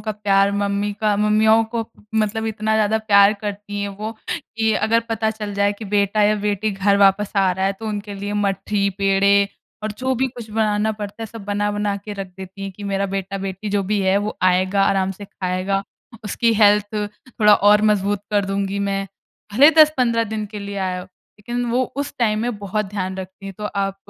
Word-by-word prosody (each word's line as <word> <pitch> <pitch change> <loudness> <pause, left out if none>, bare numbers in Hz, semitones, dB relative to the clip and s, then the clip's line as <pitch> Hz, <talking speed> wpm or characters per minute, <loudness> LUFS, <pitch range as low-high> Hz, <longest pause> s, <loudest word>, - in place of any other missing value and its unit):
का 215 - -3
प्यार 200 -1 +2
मम्मी 200 0 -1
का 210 -2 +2
मम्मियों 215 +2 +4
को 230 - 0 0.3
मतलब 220 0 0
इतना 220 0 -1
ज़्यादा 220 0 +2
प्यार 200 -2 +5
करती 205 0 -5
हैं 200 - -2
वो 210 +3 -6 0.2
कि 220 0 -2
अगर 225 +2 +2
पता 220 -1 0
चल 210 -2 -6
जाए 200 0 +2
कि 225 - -7
बेटा 205 +1 +1
या 210 +1 +4
बेटी 205 +1 0
घर 200 0 +2
वापस 200 +1 +3
आ 195 -1 +4
रहा 190 +1 -1
है 195 - +1
तो 220 - -5
उनके 205 -1 -5
लिए 200 +1 -5
मठी 200 0 0
पेड़े 200 0 +3 0.3
और 215 -1 -3
जो 260 +4 -1
भी 260 +2 +1
कुछ 240 -3 -10
बनाना 215 0 +1
पड़ता 210 +1 -7
है - - -4
सब 220 -1 -10
बना 205 0 -1
बना 205 -1 -1
के 205 +1 -8
रख 195 -1 -5
देती 190 +1 -9
हैं 195 - -4
कि 205 +2 -10
मेरा 200 0 -1
बेटा-बेटी 195 +1 -4
जो 200 0 +1
भी 205 +1 0
है 190 +1 +3
वो 210 +1 -3
आएगा 185 +2 +3
आराम 195 -1 +1
से 205 +2 -10
खाएगा। 190 +1 -2 0.4
उसकी 230 +3 +1
हेल्थ 210 0 +4
थोड़ा 210 +1 +2
और 205 +1 +4
मजबूत 205 0 0
कर 205 -1 +2
दूँगी 195 0 -2
मैं। 195 0 -1 0.5
भले 280 +8 +7
10-15 250 -7 +5
दिन 215 -1 -4
के 210 +1 -8
लिए 200 0 -6
आया 185 -1 -2
हो। 180 - -9 0.3
लेकिन 240 +4 -3
वो 250 +2 +2
उस 285 0 -3
टाइम 215 -3 +2
में 240 -3 -2
बहुत 205 +1 -2
ध्यान 190 -1 -4
रखती 190 +1 -8
है। 195 - -6
तो 210 - -5
आप 195 -1 -2
205 Hz, 205 wpm, -21 LUFS, 195-215 Hz, 0.5 s, भले